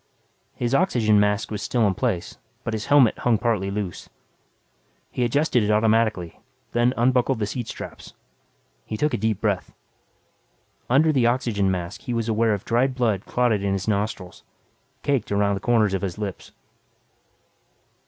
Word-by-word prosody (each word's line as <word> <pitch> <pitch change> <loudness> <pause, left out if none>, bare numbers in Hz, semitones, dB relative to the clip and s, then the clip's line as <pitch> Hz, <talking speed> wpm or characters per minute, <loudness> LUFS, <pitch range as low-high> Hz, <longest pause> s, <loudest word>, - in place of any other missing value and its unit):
His 120 +1 -2
oxygen 120 - +3
mask 105 +1 +1
was 105 -1 -4
still 120 -3 +1
in 100 - +2
place, 90 -1 -2 0.2
but 115 - -3
his 110 -1 -4
helmet 140 -6 +4
hung 120 -2 +2
partly 105 -4 0
loose. 100 -3 -5 1.0
He 125 - -1
adjusted 130 +1 +2
it 105 - 0
automatically, 110 -4 +1 0.3
then 120 +2 +2
unbuckled 125 +1 +2
the 110 - -1
seat 110 +3 -5
straps. - - -9 0.7
He 110 - -4
took 150 +7 0
a - - +1
deep 110 -1 -1
breath. 100 -5 -2 1.1
Under 150 +6 +4
the 130 -5 +3
oxygen 115 -5 +1
mask, 90 +1 -3
he 125 -3 -4
was 115 -1 -1
aware 110 -1 +2
of 100 - -9
dried 125 +3 +1
blood 110 -6 0
clotted 120 -5 +1
in 100 -1 0
his 95 -1 -3
nostrils, 100 -3 -2 0.6
caked 135 -8 0
around 100 0 +2
the 100 - -2
corners 110 -4 +2
of 95 - -1
his 95 -4 -4
lips. 100 -6 -6
110 Hz, 160 wpm, -23 LUFS, 100-120 Hz, 1.1 s, helmet